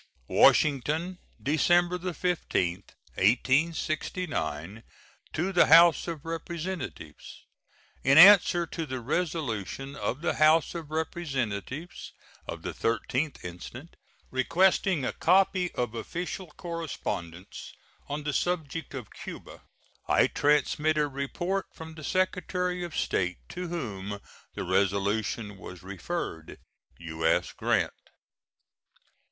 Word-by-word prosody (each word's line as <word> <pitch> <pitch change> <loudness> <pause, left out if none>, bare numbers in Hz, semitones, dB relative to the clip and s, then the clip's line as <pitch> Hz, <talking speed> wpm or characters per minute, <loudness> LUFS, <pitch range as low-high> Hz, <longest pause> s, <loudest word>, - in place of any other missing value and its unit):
WASHINGTON, 155 +6 +3 0.2
December 175 +4 +3
15, 165 - 0 0.4
1869. 130 - 0 0.5
To 175 +5 -1
the 175 - +5
House 165 0 +7
of 165 -3 -5
Representatives: 170 +2 -6 0.6
In 135 +2 +5
answer 175 -1 +8
to 165 -1 -5
the 130 -1 -4
resolution 135 - -3
of 115 +7 -3
the 175 - +1
House 155 0 +4
of 165 -4 -6
Representatives 145 - -4 0.3
of - - -6
the - - -4
13th 130 +5 -1
instant, 115 - -9 0.4
requesting 175 +3 +2
a 115 - -1
copy 185 -1 +3
of 120 -2 -2
official 175 - -5
correspondence 145 - -6 0.4
on 145 +1 -4
the 150 0 -2
subject 165 -4 -2
of 125 -6 -8
Cuba, - - -9 0.5
I - - +4
transmit 150 +1 +2
a 150 -1 +2
report 175 +8 -3
from 160 0 -9
the 155 -1 -11
Secretary 180 0 -1
of 170 -3 -6
State, 90 -1 0
to 180 0 -5
whom 105 - -5 0.4
the - - -3
resolution 100 +3 0
was 90 -3 -10
referred. 95 - -5 0.4
U.S. 80 0 0
GRANT. - - 0
150 Hz, 105 wpm, -28 LUFS, 110-175 Hz, 0.6 s, answer